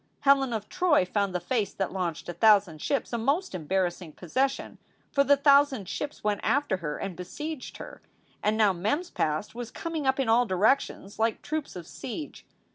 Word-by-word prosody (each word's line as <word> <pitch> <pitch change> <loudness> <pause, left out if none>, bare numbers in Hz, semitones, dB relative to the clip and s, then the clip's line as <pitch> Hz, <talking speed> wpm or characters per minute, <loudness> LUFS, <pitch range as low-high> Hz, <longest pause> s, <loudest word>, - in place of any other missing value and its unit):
Helen 275 -2 +4
of 215 -2 -3
Troy 325 - +3
found 200 0 -1
the - - +1
face 205 +4 -1
that 195 - -2
launched 175 -4 -3
a 175 - -4
thousand 200 -7 +4
ships 280 -3 -1
a 235 - 0
most 280 - 0
embarrassing 175 -1 -2
possession, 260 - -2 0.3
for 280 -1 +3
the 285 +1 +4
thousand 280 -6 +4
ships 295 +9 -5
went 210 -1 0
after 280 -9 +1
her 150 -4 -4
and 195 -3 -5
besieged 295 - -6
her. - - -10 0.4
And 210 +1 +1
now 210 -3 +4
Mem 210 - 0
s 360 - -13
past 155 +6 -1
was 240 -1 -6
coming 325 -4 -4
up 265 +1 +2
in 265 - +1
all 235 +2 +4
directions 200 +1 +1
like 225 0 0
troops 310 -1 -4
of 175 -2 -7
siege. 295 - -7
220 Hz, 190 wpm, -27 LUFS, 185-280 Hz, 0.4 s, Helen